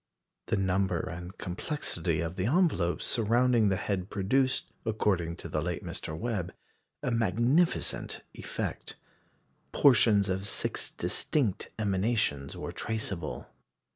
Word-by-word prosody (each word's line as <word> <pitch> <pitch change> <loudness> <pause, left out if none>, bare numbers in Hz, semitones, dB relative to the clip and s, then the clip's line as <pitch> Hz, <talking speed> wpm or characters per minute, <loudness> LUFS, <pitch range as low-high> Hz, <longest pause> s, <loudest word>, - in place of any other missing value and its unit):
The 110 - +1
number 95 -1 +1
and 90 +2 -6
complexity 85 - -2
of 85 +1 -3
the 95 +3 -1
envelopes 145 - +2
surrounding 115 0 +3
the 95 - +2
head 95 0 -2
produced, 130 +7 +1
according 95 -7 0
to 85 - -8
the 75 -1 -1
late 85 +1 -3
Mr. 80 - -4
Webb, 95 -3 -3 0.5
a 125 - 0
magnificent 120 - +1
effect. - - -5 0.8
Portions 110 -7 +5
of 95 +1 -1
six - - +1
distinct 120 -11 0
emanations 100 -8 0
were - - -5
traceable. 100 -7 -3
100 Hz, 115 wpm, -30 LUFS, 90-115 Hz, 0.8 s, Portions